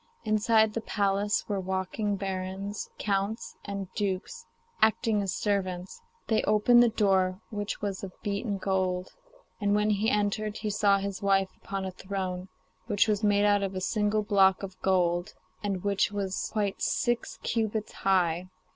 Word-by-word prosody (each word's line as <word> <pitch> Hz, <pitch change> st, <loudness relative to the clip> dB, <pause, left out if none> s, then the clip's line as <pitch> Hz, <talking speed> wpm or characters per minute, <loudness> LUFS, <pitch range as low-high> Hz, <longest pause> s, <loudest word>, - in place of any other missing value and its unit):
Inside 220 Hz, 0 st, +3 dB
the 230 Hz, -, -2 dB
palace 205 Hz, -1 st, 0 dB
were 205 Hz, -2 st, -1 dB
walking 190 Hz, +3 st, -1 dB
barons, 195 Hz, +1 st, -4 dB
counts, 200 Hz, +2 st, -2 dB
and 200 Hz, -1 st, -4 dB
dukes, 205 Hz, -, -3 dB, 0.3 s
acting 220 Hz, -1 st, +3 dB
as 195 Hz, -2 st, -1 dB
servants; 190 Hz, -, -2 dB, 0.2 s
they 220 Hz, -, +2 dB
opened 215 Hz, +3 st, +5 dB
the 240 Hz, -, +5 dB
door, 190 Hz, -4 st, +2 dB
which 205 Hz, -1 st, -4 dB
was 200 Hz, -2 st, -3 dB
of 190 Hz, -, -5 dB
beaten 205 Hz, 0 st, -2 dB
gold. 185 Hz, -1 st, -1 dB, 0.5 s
And 205 Hz, -1 st, +2 dB
when 210 Hz, +1 st, +2 dB
he 210 Hz, +2 st, +2 dB
entered, 210 Hz, +1 st, 0 dB
he 215 Hz, -1 st, -2 dB
saw 200 Hz, -1 st, +4 dB
his 195 Hz, -1 st, -4 dB
wife 195 Hz, -1 st, +3 dB
upon 195 Hz, -1 st, -5 dB
a 190 Hz, -, -3 dB
throne 185 Hz, -1 st, -4 dB, 0.4 s
which 205 Hz, +1 st, +3 dB
was 210 Hz, 0 st, 0 dB
made 205 Hz, 0 st, +4 dB
out 205 Hz, -1 st, +4 dB
of 195 Hz, -1 st, -2 dB
a -, -, -1 dB
single 210 Hz, +2 st, +1 dB
block 195 Hz, -2 st, +4 dB
of 190 Hz, -1 st, -8 dB
gold, 175 Hz, -2 st, +1 dB, 0.3 s
and 195 Hz, -3 st, -2 dB
which 200 Hz, 0 st, +1 dB
was 195 Hz, -2 st, -2 dB
quite 205 Hz, -3 st, -1 dB
six 240 Hz, -1 st, 0 dB
cubits 220 Hz, -2 st, -1 dB
high. 180 Hz, -2 st, +1 dB
200 Hz, 155 wpm, -28 LUFS, 190-210 Hz, 0.5 s, opened